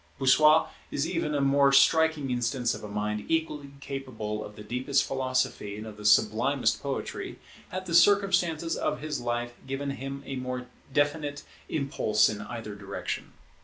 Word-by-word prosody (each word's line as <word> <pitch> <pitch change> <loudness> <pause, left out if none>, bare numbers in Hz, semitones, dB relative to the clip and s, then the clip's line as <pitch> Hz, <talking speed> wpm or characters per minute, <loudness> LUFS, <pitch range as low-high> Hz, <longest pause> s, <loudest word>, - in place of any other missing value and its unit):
Bossuet 150 +4 +5 0.2
is 145 +3 -1
even 150 -2 -1
a 140 - +1
more 140 0 +4
striking 150 0 +4
instance 120 0 0
of - - -8
a - - -5
mind 105 0 -2
equally 160 -3 -1
capable 115 -7 -5
of 105 - -10
the 105 - -9
deepest 130 +5 +1
philosophy 130 -6 -1
and 105 - -7
of 110 -1 -9
the 105 - -10
sublimest 105 0 +3
poetry, - - -4 0.3
had 185 0 -5
the 170 - -5
circumstances 175 -3 +4
of - - -2
his 150 -3 -3
life 120 0 -2
given 135 +1 -2
him 135 +1 -6
a 135 0 -4
more 125 0 -4 0.3
definite 145 0 0 0.3
impulse 110 -7 +2
in 105 -1 -4
either 110 0 -6
direction. 100 -1 -5
135 Hz, 160 wpm, -28 LUFS, 110-150 Hz, 0.3 s, Bossuet